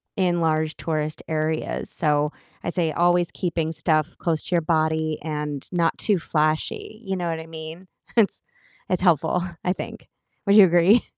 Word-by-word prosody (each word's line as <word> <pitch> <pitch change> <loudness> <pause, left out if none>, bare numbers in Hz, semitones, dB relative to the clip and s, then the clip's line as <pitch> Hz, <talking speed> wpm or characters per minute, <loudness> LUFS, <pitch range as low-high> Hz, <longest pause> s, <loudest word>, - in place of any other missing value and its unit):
in 180 -3 +1
large 155 -1 +1
tourist 155 -1 -3
areas, 155 0 -2
so, 150 -1 +1 0.3
I'd 175 - -3
say 170 -3 +1
always 175 +1 +2
keeping 165 -3 -2
stuff 155 0 0
close 165 -3 -1
to 180 - -1
your 170 - +3
body 160 -1 +1
and 150 -3 -4
not 170 -2 +1
too 205 -4 +1
flashy, 155 +7 -1
you 190 0 -1
know 175 -2 -2
what 160 -1 -2
I 160 - -11
mean? 160 +3 -9 0.3
It's 215 -3 +3 0.5
it's 185 -1 0
helpful, 170 -1 +3 0.2
I 180 - +1
think. - - -8 0.4
Would 200 +1 +4
you 205 -3 +10
agree? 175 +6 +5
165 Hz, 165 wpm, -24 LUFS, 155-175 Hz, 0.5 s, you